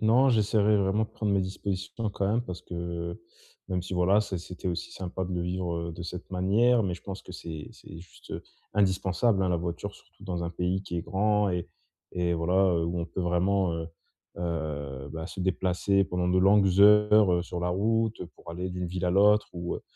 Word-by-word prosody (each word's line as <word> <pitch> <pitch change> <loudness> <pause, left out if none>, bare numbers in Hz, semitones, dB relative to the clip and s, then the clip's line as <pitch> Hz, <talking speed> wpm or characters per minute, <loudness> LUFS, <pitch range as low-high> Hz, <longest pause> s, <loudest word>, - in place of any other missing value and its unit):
Non, 125 +5 +5
j'essaierai 105 -2 +3
vraiment 100 +2 +2
de - - -10
prendre 105 -2 -2
mes 100 - +3
dispositions 95 +3 -3
quand 100 - -1
même 110 +4 +2
parce 90 -6 -7
que, 85 +2 -5 0.5
même 90 -1 -1
si, 90 - -7
voilà, 95 +4 +4
ça 95 -4 -3
c'était 90 +2 -6
aussi 85 -1 -3
sympa 95 0 -4
de 90 - -5
le 90 -1 -1
vivre, 90 -1 -2
heu, - - -5
de 85 - -7
cette 90 +2 -7
manière 110 +6 +3
mais 95 -3 -1
je - - -12
pense 95 -1 -7
que - - -13
c'est 80 -4 -7
c'est 80 - -12
juste, 90 +1 -15
heu, - - -4 0.3
indispensable, 95 +1 +2
hein, 95 - +1
la 90 - +2
voiture. 85 +4 -4
Surtout 100 - -18
dans 90 -2 -3
un 85 - -3
pays 90 +2 -1
qui 85 -3 -5
est 85 - -2
grand 105 +1 +1
et 90 -1 -2 0.4
et 90 -1 0
voilà, 85 +2 0 0.2
heu, 85 0 +1
où 85 +1 -2
on 85 - -3
peut 85 +2 -5
vraiment, 90 +1 +1
heu 80 -1 -4 0.5
heu, 75 -5 -4
bah, 80 0 -5
se 95 - -7
déplacer 95 +1 +1
pendant 90 -1 -1
de 90 +1 +3
longues 95 0 +4
heures, 105 -1 +7
heu, 85 - +1
sur 85 0 -5
la 90 - 0
route 110 +3 0
pour - - -11
aller 90 +2 -4
d'une 90 0 -3
ville 90 +1 -3
à 90 - +2
l'autre 105 +3 +4
ou 85 0 -4
heu - - -11
90 Hz, 220 wpm, -28 LUFS, 85-100 Hz, 0.5 s, heures